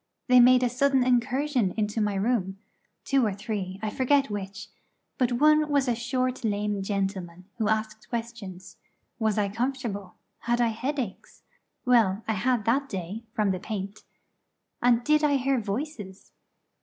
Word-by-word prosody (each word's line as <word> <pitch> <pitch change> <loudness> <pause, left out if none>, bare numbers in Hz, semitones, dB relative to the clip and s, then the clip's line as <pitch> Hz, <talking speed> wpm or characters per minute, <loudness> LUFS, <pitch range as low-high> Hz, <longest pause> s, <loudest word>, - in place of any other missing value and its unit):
They 250 -1 +7
made 250 +1 +6
a - - +4
sudden 265 +1 +2
incursion 250 -2 +1
into 210 +1 0
my 205 -1 0
room 195 -2 0 0.5
two 275 -1 +2
or 210 -4 0
three, 200 -3 -4
I 215 - -1
forget 275 +1 +2
which, 205 +1 -6 0.5
but 250 -1 +2
one 305 +4 +4
was 280 -2 +2
a 245 - +2
short 255 +2 -2
lame 205 -2 -1
gentleman 190 -3 -3
who 215 -2 +1
asked 220 0 -2
questions: 225 -6 -6 0.4
Was 220 -2 +1
I 205 -1 +2
comfortable? 225 -3 -3 0.2
Had 240 +1 0
I 240 -1 +3
headaches? 245 -2 -4 0.4
(well, 225 -5 +3
I 220 - +1
had 225 +2 0
that 275 +4 +1
day, 195 +4 -5
from 210 -2 +1
the 185 - -2
paint) 200 0 -6 0.8
and 240 -1 +3
did 305 +3 +3
I 290 -1 +3
hear 270 0 +1
voices? 210 -3 -5
225 Hz, 155 wpm, -27 LUFS, 200-255 Hz, 0.8 s, They